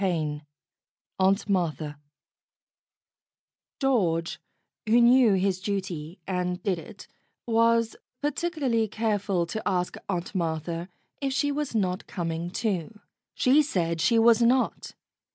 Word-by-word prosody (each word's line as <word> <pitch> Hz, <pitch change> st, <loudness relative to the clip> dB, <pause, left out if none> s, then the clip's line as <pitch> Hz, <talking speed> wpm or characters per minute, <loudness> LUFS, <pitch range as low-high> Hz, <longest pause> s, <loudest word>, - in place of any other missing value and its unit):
XIII 155 Hz, -6 st, -1 dB, 0.8 s
AUNT 195 Hz, +2 st, +2 dB
MARTHA 160 Hz, -6 st, -1 dB, 1.8 s
GEORGE, 180 Hz, -, +1 dB, 0.5 s
who 235 Hz, +2 st, +6 dB
knew 240 Hz, -2 st, +6 dB
his 190 Hz, -1 st, +1 dB
duty 185 Hz, -4 st, -4 dB
and 180 Hz, -1 st, -2 dB
did 185 Hz, -4 st, 0 dB
it, -, -, -12 dB, 0.4 s
was 230 Hz, 0 st, +2 dB, 0.2 s
particularly 290 Hz, -6 st, 0 dB
careful 205 Hz, -4 st, 0 dB
to 220 Hz, +6 st, -4 dB
ask 180 Hz, -2 st, -1 dB
Aunt 180 Hz, -1 st, -3 dB
Martha 165 Hz, 0 st, -2 dB, 0.3 s
if 270 Hz, -1 st, -1 dB
she 285 Hz, +1 st, +1 dB
was 285 Hz, -4 st, -3 dB
not 185 Hz, -2 st, -1 dB
coming 170 Hz, -1 st, -3 dB
too. 210 Hz, +1 st, -3 dB, 0.4 s
She 270 Hz, +4 st, +4 dB
said 170 Hz, -, -1 dB
she 230 Hz, +7 st, +3 dB
was 230 Hz, +1 st, +5 dB
not. 245 Hz, +2 st, +1 dB
195 Hz, 115 wpm, -26 LUFS, 175-230 Hz, 1.8 s, who